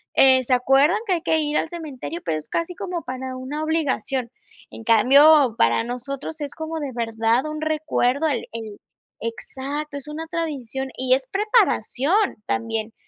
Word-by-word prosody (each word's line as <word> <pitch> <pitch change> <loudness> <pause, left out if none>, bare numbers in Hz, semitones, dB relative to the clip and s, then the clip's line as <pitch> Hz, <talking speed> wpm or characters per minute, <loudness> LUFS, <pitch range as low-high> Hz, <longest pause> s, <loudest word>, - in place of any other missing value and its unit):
eh, 260 -1 +6
se 255 - 0
acuerdan 270 +8 +4
que 375 - +2
hay 335 - 0
que 320 - +2
ir 300 0 0
al - - 0
cementerio, 325 0 -6
pero 155 - -1
es 155 - -9
casi 335 +2 -2
como 365 -4 -4
para 260 0 -5
una 280 +4 -5
obligación. 270 -6 -1 0.4
En 225 - -10
cambio, 265 +3 +6
para 115 - +3
nosotros 275 +6 -5
es 285 - -4
como 320 0 -4
de 285 -3 -4
verdad 230 +2 0
un 305 0 -5
recuerdo 310 -2 0
el 270 -6 -1
el 220 -3 -7 0.4
exacto, 275 +5 -5
es 280 +1 -9
una 320 +2 -6
tradición 270 -6 -4
y 255 0 +3
es 265 -1 -4
preparación 400 - +2
también. 225 -1 -2
275 Hz, 165 wpm, -23 LUFS, 245-315 Hz, 0.4 s, eh